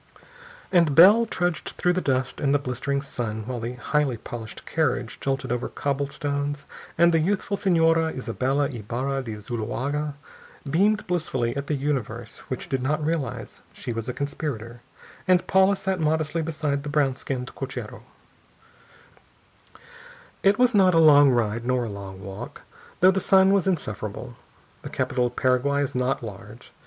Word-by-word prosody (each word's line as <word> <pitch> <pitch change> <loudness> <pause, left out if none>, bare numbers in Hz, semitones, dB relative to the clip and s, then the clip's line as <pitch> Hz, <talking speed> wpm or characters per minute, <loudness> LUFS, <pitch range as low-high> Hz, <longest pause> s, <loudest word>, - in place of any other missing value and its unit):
And 170 -6 +4
Bell 210 +8 +8
trudged 175 -6 -2
through 180 - +2
the 185 - 0
dust 130 -3 -1
and 140 0 +2
the - - +6
blistering 140 +1 -2
sun 110 -5 -4
while 125 0 -4
the 115 +2 -4
highly 135 0 0
polished 110 0 -8
carriage 130 -7 -1
jolted 135 -2 -2
over 120 0 -2
cobble 140 0 -2
stones 145 0 -3 0.3
and 170 +1 +5
the 165 - +4
youthful 195 +4 0
Señora 165 -4 +3
Isabella 135 +2 0
Ybarra 130 +3 -3
de 115 -4 -6
Zuloaga 130 +7 -3 0.5
beamed 205 +9 +2
blissfully 135 -9 -1
at 140 0 -4
the 150 - 0
universe 125 -5 -3
which 130 - -5
did 135 -1 -1
not 150 +3 0
realize 160 -3 -3
that - - -22
she 120 - -4
was 115 +1 -4
a - - -2
conspirator, 120 -5 -5 0.5
and 180 -1 +4
Paula 190 +1 +4
sat 190 -1 -2
modestly 155 +1 0
beside 150 -3 -2
the 145 - -6
brown 145 -3 +2
skinned 130 -1 -5
cochero. - - -6 2.4
It 195 +1 +4
was 250 0 +4
not 190 -4 +5
a - - +5
long 145 -3 +7
ride 115 -2 0
nor 125 0 +1
a 115 - -4
long 100 -1 -8
walk, 95 0 -8 0.4
though 185 +1 +7
the 190 - 0
sun 190 +1 +5
was 195 -1 +2
insufferable. 120 - -3 0.5
The - - -7
capital 125 0 0
of 120 - -10
Paraguay 135 +3 +2
is 140 - -4
not 125 0 -1
large. 110 +2 -10
140 Hz, 160 wpm, -25 LUFS, 125-165 Hz, 2.4 s, Bell